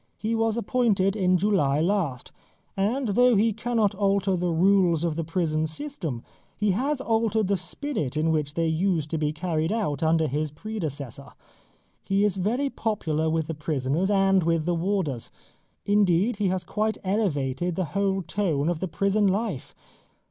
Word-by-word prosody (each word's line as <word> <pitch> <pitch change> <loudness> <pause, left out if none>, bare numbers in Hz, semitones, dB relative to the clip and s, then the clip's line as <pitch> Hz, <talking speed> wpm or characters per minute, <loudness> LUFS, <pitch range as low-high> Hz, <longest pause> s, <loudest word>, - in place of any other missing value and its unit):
He 220 +1 -2
was 225 0 +1
appointed 210 -4 +1
in 185 -3 +3
July 170 -8 +2
last, 165 -7 -1 0.4
and 225 +6 0
though 245 +4 +4
he 220 +2 +3
cannot 225 -2 0
alter 195 -1 +1
the 180 0 -1
rules 175 -1 +3
of 165 -3 0
the 165 - -2
prison 160 -1 -1
system, 160 - -5 0.3
he 210 -2 +1
has 265 +8 -1
altered 225 -3 +1
the 200 - +3
spirit 175 - -3
in 160 +1 +2
which 150 -1 -1
they 165 - +1
used 160 -1 0
to 160 - -1
be 150 -1 0
carried 160 +1 -1
out 200 -11 -1
under 160 0 +3
his 150 +3 -1
predecessor. 145 - -6 0.7
He 195 +1 +1
is 205 -2 +1
very 245 +9 0
popular 160 -8 -1
with 160 0 0
the 165 - -4
prisoners 150 +3 -1
and 195 -1 +3
with 165 -1 +1
the 175 - +1
warders. 170 - -1 0.6
Indeed 205 +2 +2
he 205 -2 +1
has 185 0 -1
quite 215 +4 -1
elevated 175 - -1
the 185 - -1
whole 195 -1 0
tone 165 -7 0
of 175 -2 -1
the 190 - -2
prison 200 +4 +1
life. 195 - -2
185 Hz, 165 wpm, -25 LUFS, 160-210 Hz, 0.7 s, though